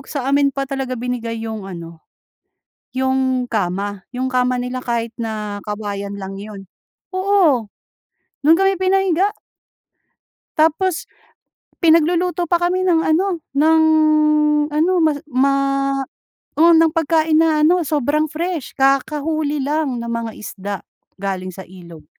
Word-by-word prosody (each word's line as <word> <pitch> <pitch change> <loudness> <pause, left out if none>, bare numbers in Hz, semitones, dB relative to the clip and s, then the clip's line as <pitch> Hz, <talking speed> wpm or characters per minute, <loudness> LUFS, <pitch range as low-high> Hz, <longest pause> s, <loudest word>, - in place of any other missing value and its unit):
sa 280 -4 -4
amin 280 0 +3
pa 275 0 -3
talaga 270 -2 -3
binigay 230 -2 -4
yung 220 -3 -6
ano 170 -2 -9 0.9
yung 260 -1 0
kama. 200 -2 -2
Yung 255 +1 -3
kama 250 -1 +1
nila 250 +1 -4
kahit 235 -1 -2
na 215 -3 -5
kawayan 200 -1 -5
lang 195 0 -6
yun. 200 -1 -9 0.5
Oo, 365 - +2 0.7
dun 310 +3 +5
kami 390 0 +1
pinahiga. 380 0 +2 1.3
Tapos 325 +3 +1 0.7
pinagluluto 345 +2 +3
pa 345 - +3
kami 370 +1 +1
ng 330 -2 +3
ano 340 +1 +1
ng 315 +3 +4 0.9
ano 325 +5 +2
ma 310 -1 +4 0.2
ma 275 +1 +2 1.0
oo 335 +2 +6
ng 325 0 +5
pagkain 320 -1 +2
na 315 -2 +3
ano 355 +3 +4
sobrang 300 +1 +1
fresh. 330 -2 -4
Kakahuli 290 +2 0
lang 280 -4 -1
na 235 - -5
mga 230 -1 -3
isda 200 -1 -6 0.4
galing 185 -2 -4
sa 190 - -8
ilog. 170 -4 -13
270 Hz, 125 wpm, -19 LUFS, 220-320 Hz, 1.3 s, oo